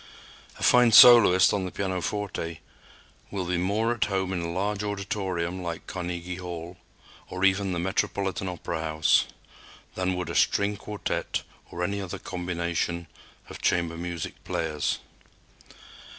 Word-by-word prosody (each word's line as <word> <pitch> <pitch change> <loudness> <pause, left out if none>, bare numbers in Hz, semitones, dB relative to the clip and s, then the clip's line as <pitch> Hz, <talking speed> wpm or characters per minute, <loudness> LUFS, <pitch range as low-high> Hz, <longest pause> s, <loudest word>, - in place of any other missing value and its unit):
A - - -7
fine 125 -1 +6
soloist 105 -6 +8
on 100 -2 -1
the 90 - -5
pianoforte 95 -3 -3 0.7
will 95 -3 -3
be 90 0 -1
more 105 +6 +1
at 120 - 0
home 95 -2 -1
in 90 - -2
a 85 - -3
large 100 +3 -2
auditorium 95 -3 -3
like 85 -2 -5
Carnegie 90 -1 -5
Hall 90 -1 -7 0.5
or 95 +1 -1
even 95 0 +2
the 90 - -2
Metropolitan 95 +1 -1
Opera 85 -2 -4
House 80 -1 +2 0.7
than 95 0 -1
would 90 -2 -4
a - - -5
string 100 +4 +2
quartet 105 +1 -3 0.3
or 85 - -4
any 100 +2 -1
other 95 -3 -5
combination 85 -1 -3 0.4
of - - -10
chamber 85 -1 +1
music 85 -1 -6
players. 75 -2 -1
90 Hz, 135 wpm, -26 LUFS, 85-100 Hz, 0.7 s, soloist